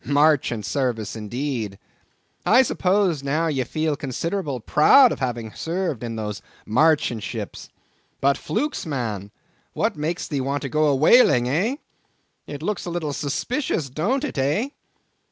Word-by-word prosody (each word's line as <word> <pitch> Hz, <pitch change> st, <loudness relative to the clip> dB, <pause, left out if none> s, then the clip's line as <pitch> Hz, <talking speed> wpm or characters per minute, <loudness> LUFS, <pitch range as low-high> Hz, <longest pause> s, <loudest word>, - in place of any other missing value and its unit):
Marchant 145 Hz, -7 st, +2 dB
service 120 Hz, -6 st, -2 dB
indeed! 115 Hz, -2 st, -4 dB, 0.7 s
I 245 Hz, +4 st, +6 dB
suppose 185 Hz, -, +1 dB
now 150 Hz, +4 st, 0 dB
ye 140 Hz, -5 st, 0 dB
feel 155 Hz, +3 st, -1 dB
considerable 145 Hz, +1 st, -3 dB
proud 230 Hz, -, +6 dB
of -, -, -4 dB
having 120 Hz, -4 st, -3 dB
served 165 Hz, -, -3 dB
in 115 Hz, -1 st, -4 dB
those 105 Hz, -2 st, -4 dB, 0.2 s
marchant 130 Hz, -2 st, +2 dB
ships. -, -, -6 dB, 0.5 s
But 140 Hz, +1 st, +3 dB
flukes! 290 Hz, -, -2 dB
man, 110 Hz, -9 st, -3 dB, 0.4 s
what -, -, 0 dB
makes 160 Hz, +4 st, -3 dB
thee 140 Hz, -3 st, -2 dB
want 140 Hz, +2 st, -2 dB
to 135 Hz, -, -3 dB
go 155 Hz, +3 st, +2 dB
a 145 Hz, -, +3 dB
whaling, 140 Hz, -, +5 dB
eh?—it 160 Hz, -, -5 dB
looks 195 Hz, -1 st, -2 dB
a -, -, -2 dB
little 165 Hz, -4 st, -3 dB
suspicious, 150 Hz, -, -2 dB
don't 220 Hz, -, 0 dB
it, 280 Hz, -, -3 dB
eh? 150 Hz, -, +1 dB
145 Hz, 140 wpm, -23 LUFS, 125-170 Hz, 0.7 s, I